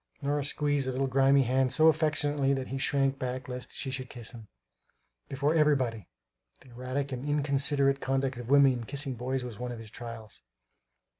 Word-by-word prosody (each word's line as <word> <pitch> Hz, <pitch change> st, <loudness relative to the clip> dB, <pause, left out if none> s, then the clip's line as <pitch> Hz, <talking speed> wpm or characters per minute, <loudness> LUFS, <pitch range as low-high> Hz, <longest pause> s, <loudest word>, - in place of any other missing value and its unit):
Nora 145 Hz, +1 st, 0 dB
squeezed 145 Hz, -1 st, 0 dB
the 130 Hz, -, -1 dB
little 135 Hz, +2 st, 0 dB
grimy 135 Hz, +1 st, +4 dB
hand 130 Hz, +1 st, +1 dB
so 155 Hz, +5 st, +5 dB
affectionately 150 Hz, -3 st, +2 dB
that 130 Hz, -1 st, -4 dB
he 135 Hz, -, -3 dB
shrank 135 Hz, 0 st, 0 dB
back 130 Hz, 0 st, -4 dB
lest 125 Hz, 0 st, -6 dB
she 135 Hz, -, -3 dB
should 130 Hz, -1 st, -5 dB
kiss 120 Hz, -3 st, -8 dB
him, 115 Hz, -4 st, -12 dB, 0.8 s
"before 140 Hz, +3 st, 0 dB
everybody" 130 Hz, -, +1 dB, 0.5 s
the 135 Hz, -, -18 dB
erratic 130 Hz, +3 st, -4 dB
and 130 Hz, 0 st, -4 dB
inconsiderate 140 Hz, -1 st, +1 dB
conduct 135 Hz, -1 st, -1 dB
of 120 Hz, 0 st, -7 dB
women 140 Hz, -1 st, +6 dB
in 120 Hz, -2 st, -4 dB
kissing 140 Hz, +2 st, -3 dB
boys 130 Hz, +2 st, -3 dB
was 120 Hz, -3 st, -8 dB
one 125 Hz, 0 st, -4 dB
of 120 Hz, -, -6 dB
his 110 Hz, -2 st, -10 dB
trials. 115 Hz, -3 st, -9 dB
135 Hz, 180 wpm, -29 LUFS, 125-140 Hz, 0.8 s, women